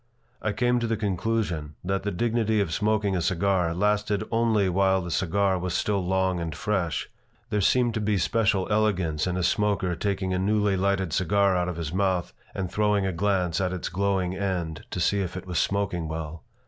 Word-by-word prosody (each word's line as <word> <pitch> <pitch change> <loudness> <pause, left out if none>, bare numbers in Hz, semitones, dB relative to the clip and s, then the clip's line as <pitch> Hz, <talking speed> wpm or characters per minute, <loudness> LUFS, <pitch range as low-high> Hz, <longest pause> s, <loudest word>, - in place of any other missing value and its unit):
I 110 - 0
came 120 +3 +1
to 120 - -1
the 115 -1 0
conclusion 95 -6 -2
that 95 +2 -1
the 100 - -2
dignity 110 +2 +1
of 85 -6 0
smoking 105 -1 +1
a 90 - 0
cigar 90 0 +1
lasted 105 +1 +1
only 115 -3 +2
while 95 +1 +3
the 85 -1 -5
cigar 95 +3 +1
was 90 0 -2
still 100 -2 0
long 95 0 +1
and 80 -2 -4
fresh. 95 -5 -1 0.4
There 105 - +1
seemed 120 +4 +3
to 110 - -2
be 105 -1 +1
special 100 +1 +1
elegance 95 -7 +1
in 90 0 -1
a 90 - -1
smoker 100 -2 +1
taking 95 0 -1
a 90 - 0
newly 105 +1 +2
lighted 95 -3 0
cigar 100 +1 +2
out 90 0 0
of 90 - -5
his 80 -1 -4
mouth 95 -2 0 0.2
and 95 -3 -3
throwing 105 -2 +2
a 95 - -1
glance 90 -1 0
at 95 -1 0
its 90 - -3
glowing 95 -1 0
end 90 -5 -3
to - - -4
see 100 +4 +2
if 95 -1 -4
it 95 - -7
was 90 -3 -1
smoking 100 -4 -1
well. 80 0 -5
95 Hz, 200 wpm, -26 LUFS, 90-105 Hz, 0.4 s, while